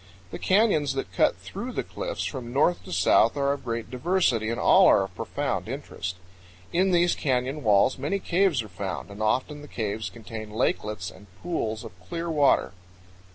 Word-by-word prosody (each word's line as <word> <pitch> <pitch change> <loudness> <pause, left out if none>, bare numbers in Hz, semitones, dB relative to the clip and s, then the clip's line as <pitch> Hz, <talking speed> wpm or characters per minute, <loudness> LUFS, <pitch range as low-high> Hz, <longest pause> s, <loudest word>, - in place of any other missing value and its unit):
The - - -6
canyons 185 -9 +3
that 135 - -4
cut - - +3
through - - -7
the - - -2
cliffs - - -4
from 120 -2 -5
north 150 +7 +2
to 185 - -9
south 150 - +4
are 140 0 +2
of 140 - -7
great 115 -2 -4
diversity 125 - +1
and 115 - -2
all - - +6
are 100 - +5
of 95 -1 -7
profound - - -3
interest. 95 -1 -5 0.6
In 185 +3 +3
these 175 -1 +3
canyon 135 +1 -1
walls 105 +3 +3
many 150 +9 -1
caves 180 - +1
are - - -10
found, 95 +1 -5
and 100 +2 -8
often 130 +7 0
the 145 - -10
caves 110 -3 -3
contain 110 -1 -8
lakelets 105 -3 -1
and 105 - -16 0.2
pools 110 -11 -2
of - - -8 0.2
clear 170 +5 -3
water. 145 -3 +3
130 Hz, 180 wpm, -26 LUFS, 110-165 Hz, 0.6 s, all